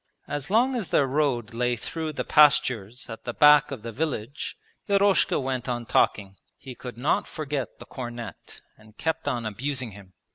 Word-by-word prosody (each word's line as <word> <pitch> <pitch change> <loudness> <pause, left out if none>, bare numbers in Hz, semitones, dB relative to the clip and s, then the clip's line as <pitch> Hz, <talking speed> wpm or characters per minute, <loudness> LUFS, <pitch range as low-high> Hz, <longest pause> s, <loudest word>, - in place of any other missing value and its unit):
As 145 +1 -4
long 245 +6 +3
as 220 -7 -3
their 140 - +3
road 130 -5 0
lay 120 +1 +1
through 160 +6 -4
the - - -2
pastures 125 -6 +3
at 115 -2 -8
the 120 - -5
back 150 0 +7
of 130 -6 -7
the 115 - -5
village 140 -1 -3 0.3
Eroshka 200 0 +3
went 130 -2 -3
on 120 -1 -2
talking. 100 -3 +1 0.2
He 130 - -9
could 125 -1 -9
not 155 +11 +1
forget 145 -4 -4
the - - -11
cornet 120 -2 -8 0.2
and 110 0 -19
kept 160 0 -2
on 120 -2 -1
abusing 125 +3 -3
him. 95 -2 -14
130 Hz, 175 wpm, -26 LUFS, 115-150 Hz, 0.3 s, back